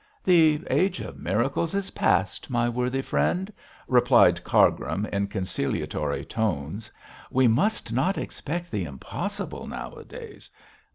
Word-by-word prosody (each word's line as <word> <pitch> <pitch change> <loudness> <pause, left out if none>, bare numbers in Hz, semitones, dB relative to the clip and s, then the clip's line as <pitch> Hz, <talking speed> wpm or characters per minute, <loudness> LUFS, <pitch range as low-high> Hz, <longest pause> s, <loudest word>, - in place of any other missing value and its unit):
'The 160 -3 +5
age 190 0 +2
of - - -7
miracles 130 - 0
is 195 -1 -2
past, 95 +4 0
my 120 -2 +1
worthy 125 +2 -1
friend,' 180 - 0 0.3
replied - - +5
Cargrim, 100 - +2
in 100 0 0
conciliatory 90 -6 -2
tones. 105 -1 -2 0.4
'We 130 -2 +4
must 135 - +1
not 145 +11 +1
expect 175 +3 -5
the 100 -4 -1
impossible 70 -4 -5
nowadays. - - -9
120 Hz, 115 wpm, -26 LUFS, -, 0.4 s, The